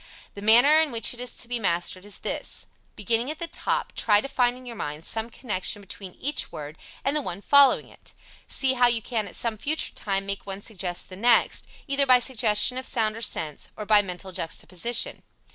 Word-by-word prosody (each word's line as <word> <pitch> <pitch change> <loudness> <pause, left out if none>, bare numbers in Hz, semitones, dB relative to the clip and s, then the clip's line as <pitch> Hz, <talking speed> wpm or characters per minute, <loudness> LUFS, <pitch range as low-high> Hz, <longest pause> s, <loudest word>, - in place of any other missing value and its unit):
The 200 - -9
manner 245 +9 +7
in 315 - 0
which 230 0 +1
it 245 - -12
is 250 -1 -6
to 245 - -5
be 240 0 -1
mastered 185 0 -2
is 205 - -8
this: - - -4 0.3
Beginning 230 +5 0
at 310 - -4
the 340 - -4
top, 335 - -3
try 210 -2 +3
to 245 - -4
find 250 -2 +1
in 255 - -14
your 240 -1 -8
mind 150 -4 -6
some 225 +1 -3
connection 205 -4 -3
between 195 -2 -10
each 290 +1 -1
word 150 +1 -8 0.3
and 280 - +1
the 300 - +1
one 185 -7 -6
following 280 +5 +6
it. - - -14 0.3
See 265 -1 +2
how 245 -1 +4
you 235 -2 0
can 220 -4 -2
at - - -9
some 225 -3 -2
future 310 +6 -2
time 195 -1 -2
make 200 0 -3
one 195 0 -5
suggest 185 -5 -4
the 185 - -9
next, 235 +4 +3 0.2
either 275 -1 +2
by 255 -1 +8
suggestion 240 0 +2
of 260 - -6
sound 220 -4 0
or 225 - -8
sense, 155 -8 -2
or 210 - -5
by 210 0 +6
mental 190 -1 -7
juxtaposition. 185 +6 -1
225 Hz, 210 wpm, -25 LUFS, 195-250 Hz, 0.3 s, by